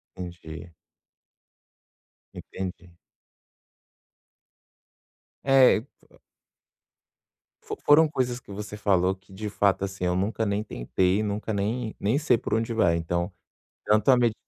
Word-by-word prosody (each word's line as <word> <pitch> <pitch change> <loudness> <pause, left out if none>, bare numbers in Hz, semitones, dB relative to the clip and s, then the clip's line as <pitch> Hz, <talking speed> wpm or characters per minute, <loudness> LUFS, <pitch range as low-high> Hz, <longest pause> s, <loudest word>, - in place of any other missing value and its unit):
Entendi. 85 -2 -8 1.6
Entendi. 90 -1 -7 2.5
É 135 -4 +6
e 110 - -5 1.8
Fo - - -6
foram 155 +2 +7
coisas 125 -4 -2
que 105 - -15
você 105 +1 -7
falou 95 -2 +2
que 95 0 -20
de 105 +2 -5
fato, 100 -1 +1
assim, 95 -2 -5
nunca 100 +5 0
nem 100 +1 -1
tentei, 95 - 0
nunca 105 +1 -3
nem 110 +3 -2
nem 110 +7 +1
sei 145 -6 +3
por - - -4
onde 115 +1 0
vai. 85 -7 +3
Então 85 +3 -2 0.5
tanto 105 +3 +2
a 130 - +7
med 120 -3 +2
105 Hz, 115 wpm, -26 LUFS, 95-115 Hz, 2.5 s, foram